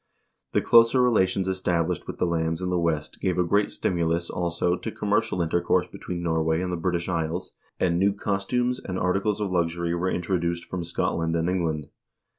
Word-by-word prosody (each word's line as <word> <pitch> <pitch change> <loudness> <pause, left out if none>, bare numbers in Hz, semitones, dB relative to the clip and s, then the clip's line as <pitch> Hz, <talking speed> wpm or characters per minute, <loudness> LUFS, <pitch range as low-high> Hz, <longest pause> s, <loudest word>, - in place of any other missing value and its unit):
The - - +2
closer 115 +2 +6
relations 95 -6 +2
established 90 -2 -1
with - - -6
the - - +1
lands 80 -1 0
in 90 - -1
the 90 - +1
West 80 -3 -2
gave 90 -2 0
a 90 - +3
great 100 +4 +2
stimulus, 85 -1 -1
also, 85 0 0
to 110 - -5
commercial 105 -3 0
intercourse 85 +2 +1
between 90 -1 -6
Norway 80 -1 +1
and 90 0 -2
the - - +1
British 85 0 -1
Isles, 85 0 -2 0.3
and 85 -1 +2
new 100 +2 +4
costumes 105 +6 -1
and 90 -1 -4
articles 95 +3 0
of 100 -3 -2
luxury 85 -1 0
were 90 +2 0
intro 90 +1 -1
duced 85 0 -2
from 90 -2 -4
Scotland 85 0 -1
and 85 0 0
England. 80 -5 -1
90 Hz, 185 wpm, -25 LUFS, 85-95 Hz, 0.3 s, closer